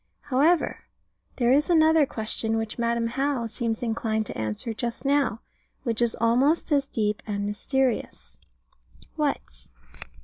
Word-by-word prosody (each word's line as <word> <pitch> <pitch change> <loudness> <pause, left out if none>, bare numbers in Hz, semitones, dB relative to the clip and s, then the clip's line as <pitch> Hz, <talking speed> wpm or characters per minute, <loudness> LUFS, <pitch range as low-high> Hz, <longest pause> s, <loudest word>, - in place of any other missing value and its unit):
However, 290 +5 +1 0.5
there 240 -1 +2
is 290 +5 +3
another 320 -3 +5
question, 220 0 -2
which 225 +1 -4
Madam 235 0 +1
How 270 +1 -1
seems 225 0 -3
inclined 220 -1 -1
to - - -5
answer 110 - -3
just 235 +2 -4
now, 275 -6 +1 0.4
which 230 -2 -1
is 235 -1 +1
almost 255 +9 +2
as 280 -2 +2
deep 210 -5 -1
and 200 -1 -2
mysterious. 255 +5 -2 0.8
What? - - -3
235 Hz, 130 wpm, -26 LUFS, 220-275 Hz, 0.8 s, another